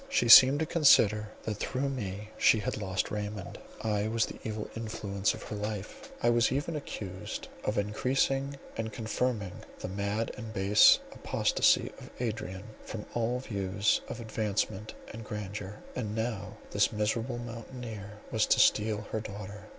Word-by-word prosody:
She 120 - +2
seemed 130 +5 +10
to - - +2
consider 110 - +5
that 105 -2 -3
through 130 +5 -1
me 105 -5 -5
she - - +5
had 105 - -2
lost 95 -1 -1
Raymond; 105 -2 -5 0.2
I 105 -1 0
was 115 +1 +1
the - - -9
evil 110 -1 -4
influence 105 -3 -1
of - - -10
her - - -6
life; 105 - -5
I 120 - +5
was 120 -1 +3
even 145 +5 -1
accused 95 -10 -6
of 105 - -1
encreasing 135 +6 0 0.2
and 110 -1 -3
confirming 110 -2 -2 0.3
the - - -5
mad 100 +3 -2
and 110 -1 -7
base 100 +2 +7
apostacy - - +2
of - - -11
Adrian 105 -5 -3 0.2
from 110 -2 -6
all 120 +2 0
views 100 -3 0
of 120 - -6
advancement 110 -2 -2 0.2
and 115 +1 -7
grandeur; 105 -1 -6
and 110 -4 -3
now 110 -4 -3
this - - +3
miserable 115 +3 -1
mountaineer 115 -3 -7
was - - +2
to - - +4
steal 105 0 +3
her 110 - -1
daughter. 105 0 -8
110 Hz, 155 wpm, -30 LUFS, 105-120 Hz, 0.3 s, seemed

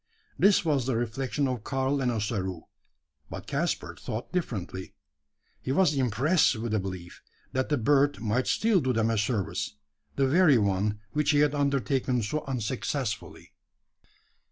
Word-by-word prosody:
This 200 -1 +4
was 140 -6 +1
the 130 - +1
reflection 125 +4 -1
of 125 -4 -3
Karl 135 +2 0
and 125 -2 +1
Ossaroo; 100 -6 -2 0.7
but - - -7
Caspar - - -2
thought 110 +2 -5
differently. 95 - -4 0.7
He 130 - -3
was 160 +2 +3
impressed 135 - +2
with 110 0 -3
a 110 - +2
belief, 90 -2 -7 0.3
that 130 0 -1
the 145 - +2
bird 145 +4 +3
might 115 +3 0
still 220 -5 +3
do 130 -2 0
them 115 0 +1
a 115 - 0
service 105 - -2 0.4
the 135 - +2
very 155 -1 +5
one 105 0 0
which 150 +2 0
he 145 -2 +4
had 150 -1 +3
undertaken 135 -3 0
so 150 +8 -2
unsuccessfully. 130 -2 -3
130 Hz, 150 wpm, -28 LUFS, 110-145 Hz, 0.7 s, very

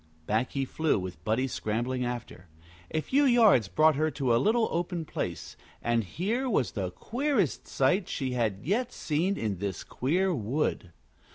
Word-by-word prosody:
Back 110 +6 0
he 135 -1 0
flew, 160 +1 +1
with 90 -4 -6
Buddie 115 +9 +1
scrambling 125 +1 -2
after. 120 -7 -5 0.4
A 155 - -1
few 280 - +2
yards 225 - +5
brought 155 +8 +4
her 155 +1 +2
to 130 -5 +1
a 120 - +3
little 225 - +3
open 170 -1 -2
place, 85 - -5 0.2
and 120 -1 +1
here 205 - -2
was 165 - +1
the 95 -3 -3
queerest 235 - -1
sight 170 +8 +1
she 130 -2 -2
had 110 -6 -1
yet 235 - 0
seen 170 +6 -1
in 105 -5 -2
this 100 -2 -3
queer 180 +8 0
wood. 115 - -1
135 Hz, 165 wpm, -28 LUFS, -, 0.4 s, yards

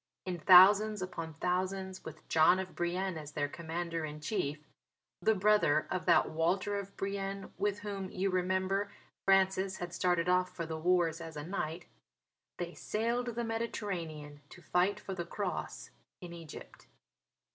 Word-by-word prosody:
In 180 -2 -3
thousands 195 +4 +7
upon 165 -3 -6
thousands, 185 +2 -2
with 160 -1 -10
John 160 +3 +5
of 190 -1 -5
Brienne 175 0 -1
as 150 -1 -9
their 145 -1 0
Commander 165 +1 -4
in 150 0 -5
Chief 150 -3 -2 0.6
(the 220 - +3
brother 195 -7 +3
of 185 0 -2
that 170 - +4
Walter 185 +5 0
of 200 0 -9
Brienne 195 0 -4
with 205 0 0
whom, 200 -2 -4
you 190 +1 -1
remember, 185 +2 0 0.3
Francis 190 0 +3
had 175 -1 -6
started 175 -1 +1 0.2
for 170 -2 -6
the 160 0 -5
wars 170 -1 +2
as 165 -2 -8
a 150 - -4
knight), 170 -2 -4 0.7
they 175 0 -4
sailed 235 +2 -2
the 235 - -1
Mediterranean 175 -10 -4
to - - -13
fight 180 +5 +1
for 195 - -6
the 180 -2 -3
Cross 185 +2 -4 0.3
in 175 -2 -9
Egypt. 165 -3 -11
185 Hz, 150 wpm, -32 LUFS, 165-195 Hz, 0.7 s, thousands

